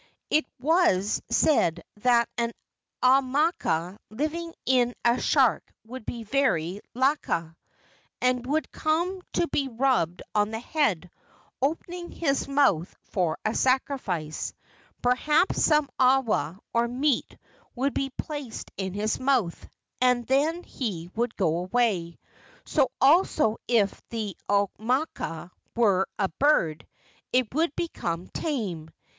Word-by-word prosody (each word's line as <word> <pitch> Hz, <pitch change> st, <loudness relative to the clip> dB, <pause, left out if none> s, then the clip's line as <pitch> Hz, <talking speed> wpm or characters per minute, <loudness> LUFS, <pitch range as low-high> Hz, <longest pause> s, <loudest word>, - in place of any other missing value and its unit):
It 310 Hz, -, +3 dB
was 265 Hz, -, +2 dB
said 170 Hz, -, +2 dB
that 235 Hz, +1 st, +3 dB
an 235 Hz, -1 st, -1 dB, 0.5 s
aumakua 255 Hz, -, +2 dB
living 310 Hz, +8 st, -3 dB
in 245 Hz, -2 st, +2 dB
a 235 Hz, +1 st, +3 dB
shark -, -, +2 dB
would 245 Hz, 0 st, -9 dB
be 235 Hz, -1 st, -4 dB
very 205 Hz, -, 0 dB
laka, 250 Hz, -, 0 dB, 0.6 s
and 250 Hz, -1 st, +1 dB
would 305 Hz, +3 st, -1 dB
come 345 Hz, +4 st, 0 dB
to 340 Hz, -, +1 dB
be 275 Hz, -1 st, 0 dB
rubbed 235 Hz, -9 st, 0 dB
on 210 Hz, 0 st, +2 dB
the 225 Hz, 0 st, -4 dB
head, 225 Hz, -, 0 dB, 0.5 s
opening 345 Hz, +5 st, -2 dB
his 280 Hz, -5 st, 0 dB
mouth 275 Hz, -, +2 dB, 0.2 s
for 175 Hz, -5 st, 0 dB
a 215 Hz, -, +1 dB
sacrifice. 245 Hz, -, -1 dB, 0.5 s
Perhaps 295 Hz, +8 st, +2 dB
some 300 Hz, -2 st, +4 dB
awa, 250 Hz, -, +2 dB, 0.2 s
or 235 Hz, 0 st, +2 dB
meat, 260 Hz, +2 st, 0 dB, 0.4 s
would 270 Hz, +3 st, 0 dB
be 270 Hz, -, -1 dB
placed 280 Hz, -3 st, -6 dB
in 190 Hz, -1 st, -3 dB
his 215 Hz, +1 st, -1 dB
mouth, 255 Hz, -10 st, 0 dB, 0.3 s
and 250 Hz, -1 st, +3 dB
then 305 Hz, +7 st, +1 dB
he 180 Hz, -9 st, -5 dB
would 235 Hz, +1 st, -1 dB
go 165 Hz, -5 st, +1 dB
away. 185 Hz, -4 st, 0 dB, 0.5 s
So 275 Hz, -5 st, +2 dB
also 290 Hz, -, +4 dB
if 215 Hz, -5 st, +2 dB
the 215 Hz, -5 st, -4 dB
au¬ 200 Hz, 0 st, +3 dB
makua 225 Hz, -, -2 dB, 0.2 s
were 200 Hz, -5 st, +3 dB
a 195 Hz, -, +1 dB
bird, 180 Hz, -, +1 dB, 0.4 s
it 250 Hz, -3 st, +1 dB
would 315 Hz, 0 st, +1 dB
become 175 Hz, -, -3 dB
tame. 200 Hz, -, -3 dB
245 Hz, 120 wpm, -26 LUFS, 200-280 Hz, 0.6 s, some